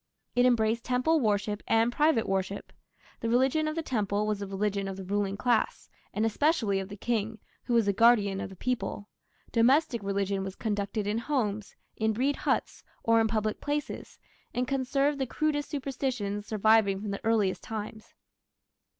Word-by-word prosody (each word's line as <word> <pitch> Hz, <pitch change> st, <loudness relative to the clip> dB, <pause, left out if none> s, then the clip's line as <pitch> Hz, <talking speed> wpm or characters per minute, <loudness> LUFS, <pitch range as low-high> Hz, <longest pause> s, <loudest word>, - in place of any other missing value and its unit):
It 245 Hz, +1 st, +5 dB
embraced 230 Hz, -1 st, +2 dB
temple 255 Hz, +6 st, +2 dB
worship 210 Hz, -3 st, 0 dB
and 225 Hz, +1 st, +3 dB
private 295 Hz, -4 st, +2 dB
worship. 195 Hz, +1 st, -2 dB, 0.5 s
The 230 Hz, -, -2 dB
religion 265 Hz, +6 st, +2 dB
of 310 Hz, -, -2 dB
the 330 Hz, -, -2 dB
temple 210 Hz, -6 st, 0 dB
was 210 Hz, -1 st, -1 dB
the 200 Hz, -, -4 dB
religion 195 Hz, 0 st, -1 dB
of 190 Hz, -1 st, -5 dB
the 195 Hz, -, -6 dB
ruling 200 Hz, +1 st, -1 dB
class, 240 Hz, -1 st, 0 dB, 0.2 s
and 215 Hz, +2 st, 0 dB
especially 225 Hz, -, +1 dB
of 190 Hz, 0 st, -5 dB
the 205 Hz, -, -8 dB
king, 220 Hz, 0 st, -1 dB, 0.3 s
who 240 Hz, -, 0 dB
was 230 Hz, -2 st, +4 dB
the 200 Hz, -, +2 dB
guardian 205 Hz, -3 st, +4 dB
of -, -, -5 dB
the 190 Hz, -, -11 dB
people. 230 Hz, -2 st, -3 dB, 0.4 s
Domestic 250 Hz, +1 st, +3 dB
religion 200 Hz, 0 st, -1 dB
was 190 Hz, 0 st, -6 dB
conducted 205 Hz, -1 st, -2 dB
in 210 Hz, +2 st, 0 dB
homes, 220 Hz, -6 st, -2 dB, 0.2 s
in 220 Hz, 0 st, +1 dB
reed 275 Hz, +5 st, +1 dB
huts, -, -, -1 dB, 0.2 s
or 230 Hz, 0 st, +4 dB
in 220 Hz, -, +2 dB
public 215 Hz, -1 st, -1 dB
places, 290 Hz, 0 st, -4 dB, 0.4 s
and 250 Hz, 0 st, 0 dB
conserved 275 Hz, +2 st, 0 dB
the 265 Hz, -, -1 dB
crudest 290 Hz, +2 st, -1 dB
superstitions 255 Hz, -8 st, -3 dB
surviving 215 Hz, -2 st, +3 dB
from 205 Hz, 0 st, -4 dB
the 200 Hz, -, -5 dB
earliest 220 Hz, -4 st, +1 dB
times. 220 Hz, 0 st, -7 dB
220 Hz, 170 wpm, -29 LUFS, 200-250 Hz, 0.5 s, It